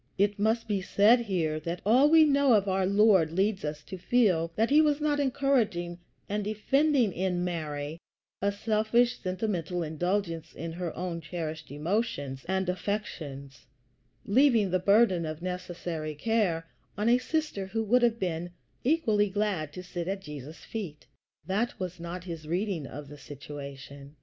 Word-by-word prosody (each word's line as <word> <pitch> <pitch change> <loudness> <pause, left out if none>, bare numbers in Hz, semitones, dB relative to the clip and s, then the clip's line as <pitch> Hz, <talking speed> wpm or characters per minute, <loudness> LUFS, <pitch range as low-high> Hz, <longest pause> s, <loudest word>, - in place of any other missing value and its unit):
It 205 +1 +1
must 220 +3 +1
be 205 -3 0
said 210 +5 +5
here 170 -9 -1
that 170 +3 -4
all 255 +7 +5
we 320 0 +7
know 280 -3 +4
of 205 -2 +3
our 190 -1 +1
Lord 200 -5 +4
leads 195 +3 0
us 150 0 -4
to 190 +2 -8
feel 180 -7 +2
that 225 +4 +1
he 300 +2 +7
was 300 -1 +2
not 295 -1 +1
encouraging 240 -11 0 0.3
and 210 +1 -2
defending 245 - +2
in 180 -1 -1
Mary 155 -3 -4 0.4
a 200 +1 +2
selfish, 220 +4 +1
sentimental 185 -3 -2
indulgence 165 +1 -2
in 165 0 -5
her 170 0 -4
own 175 -2 -3
cherished 160 -1 -5
emotions 145 - -2
and 190 0 0
affections, 145 - -4 0.6
leaving 230 -4 +4
the 185 - +2
burden 200 -2 +4
of 155 +1 -5
necessary 175 -4 -4
care 185 -3 0 0.3
on 210 +2 0
a 240 +1 +5
sister 300 -9 -2
who 225 +3 -2
would 245 +4 +3
have 235 -1 +3
been 175 -3 -2 0.3
equally 225 -8 +2
glad 195 -7 -1
to 180 - -7
sit 175 -1 -5
at 195 +1 -2
Jesus' 150 -1 -9
feet. 155 - -6 0.4
That 210 +6 -1
was 180 -2 -5
not 170 +1 -6
his 165 -4 -7
reading 175 -3 -1
of 145 +1 -8
the 145 +1 -11
situation. 140 0 -9
185 Hz, 160 wpm, -29 LUFS, 165-220 Hz, 0.6 s, we